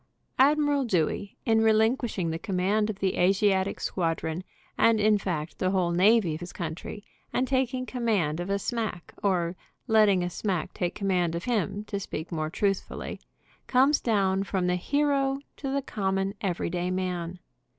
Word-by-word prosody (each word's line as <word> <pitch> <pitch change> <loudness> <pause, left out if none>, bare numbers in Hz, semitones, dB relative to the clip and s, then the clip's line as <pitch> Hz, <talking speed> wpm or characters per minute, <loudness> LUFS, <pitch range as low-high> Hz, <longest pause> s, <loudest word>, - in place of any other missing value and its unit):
Admiral 290 0 +4
Dewey, 195 -2 -1
in 225 -1 +4
relinquishing 220 -4 +2
the 165 - -3
command 200 +3 0
of 210 - -3
the 195 -1 -1
Asiatic 190 +1 +2
squadron, 165 -1 -2 0.3
and 230 -1 +4
in 210 0 +4
fact 170 -5 -4
the 185 - +1
whole 185 -2 +1
navy 190 0 +4
of 155 - -5
his 175 0 -7
country, 175 +4 -6 0.3
and 255 - 0
taking 255 -1 0
command 210 -12 0
of 175 +2 -4
a 200 - +1
smack, 215 -4 -3
or 180 -3 +1 0.3
let 220 -3 +5
ting 190 -3 +3
a 175 - -1
smack 185 -4 -2
take 175 -1 -2
command 180 -4 0
of 170 - -3
him, 210 -3 -1
to 205 -1 -4
speak 170 -4 -6
more 155 -2 -2
truthfully, 195 +3 -2 0.5
comes 270 +3 +4
down 195 -4 +2
from 190 -2 -1
the 180 0 +2
hero 275 +6 +1 0.2
to 275 - -5
the 275 0 -1
common, 195 -4 -1
everyday 180 -1 -1
man. 180 -1 -2
195 Hz, 160 wpm, -27 LUFS, 175-225 Hz, 0.5 s, let